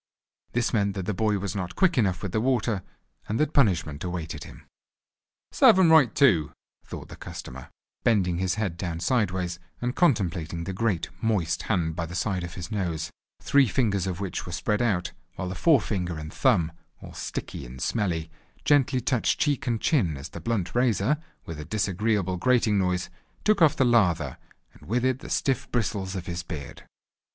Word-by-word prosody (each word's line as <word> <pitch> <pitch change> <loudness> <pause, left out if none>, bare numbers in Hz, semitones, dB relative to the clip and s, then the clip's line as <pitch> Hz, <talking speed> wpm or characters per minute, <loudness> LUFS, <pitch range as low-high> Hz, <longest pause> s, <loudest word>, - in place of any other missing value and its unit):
This 120 +1 0
meant 100 -3 +1
that 95 -3 -3
the 105 - -1
boy 105 +1 +1
was 100 -1 -4
not 90 -2 -4
quick 185 -3 +3
enough 95 -7 +1
with 100 - -3
the 110 - 0
water, 120 -5 +1 0.5
and 110 - -1
that 155 0 +1
punishment 85 - +2
awaited 80 -4 -4
him. - - -13 0.9
"Serve 245 -8 +6
"m 180 -4 +5
right 150 -8 +6
too," 95 - +4 0.3
thought - - -8
the - - -9
customer, 65 +1 -9 0.3
bending 90 -6 +2
his 95 0 0
head 100 -6 -2
down 85 -2 -3
sideways, 90 -4 0 0.2
and 125 +1 -2
contemplating 90 - +1
the 95 - -4
great 95 -4 0
moist 90 -8 0
hand 85 -6 +1
by 85 -1 -3
the 90 - -8
side 95 0 -1
of 85 0 -7
his 90 +4 -7
nose, 90 -7 -2 0.3
three 140 -2 +4
fingers 100 -5 +1
of 90 -2 -3
which 100 -3 -3
were - - -5
spread 105 +5 0
out, 95 -8 0 0.2
while 90 - -4
the - - -3
fore 150 - +4
finger 90 -6 -3
and 75 0 -7
thumb, 95 - +2 0.3
all - - -10
sticky - - -5
and 60 +1 -10
smelly, 85 - -1 0.3
gently 140 -3 +3
touched 125 -1 +1
cheek 140 -2 0
and 115 -2 0
chin 90 - +2
as 70 - -8
the - - -9
blunt 100 -7 -1
razor, 120 +2 +2 0.3
with 80 -2 -7
a - - -5
disagreeable 100 0 0
grating 115 -1 +3
noise, 90 -1 0 0.3
took 210 -3 +3
off 155 -4 +6
the 130 - +3
lather, 85 - +2 0.4
and - - -17
with 120 +3 +1
it 130 0 +1
the - - -10
stiff 135 -2 0
bristles 100 -4 -1
of 90 -2 -4
his 85 -1 -3
beard. 80 -4 -8
100 Hz, 185 wpm, -26 LUFS, 85-120 Hz, 0.9 s, Serve